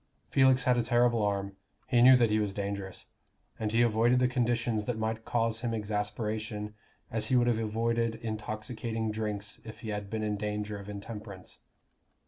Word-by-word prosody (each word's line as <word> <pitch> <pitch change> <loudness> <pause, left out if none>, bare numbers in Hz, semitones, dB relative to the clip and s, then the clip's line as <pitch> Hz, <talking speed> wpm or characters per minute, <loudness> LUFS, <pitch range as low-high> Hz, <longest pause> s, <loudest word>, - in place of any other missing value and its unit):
Felix 130 -1 +5
had 125 -1 +3
a - - +3
terrible 120 -1 +3
arm: 100 -1 -1 0.3
he 120 -2 +3
knew 130 +1 +9
that 120 -3 +3
he 110 - +3
was 100 -2 -1
dangerous; 100 -2 -4 0.5
and 110 -1 -1
he 115 +2 +4
avoided 120 +2 +3
the 125 0 +4
conditions 120 -3 0
that 125 -1 -2
might 110 0 -2
cause 115 -1 0
him 115 -1 -2
exasperation 105 0 -3 0.4
as 110 -1 0
he 130 - +2
would 120 -1 +5
have 120 -2 +2
avoided 115 +1 0
intoxicating 110 +1 -3
drinks 105 -2 -3
if 110 -1 -10
he 110 - -6
had 105 -1 -4
been 110 0 -2
in 105 -1 -1
danger 105 0 -3
of 100 +1 -9
intemperance. 105 -2 -8
110 Hz, 175 wpm, -30 LUFS, 105-115 Hz, 0.5 s, knew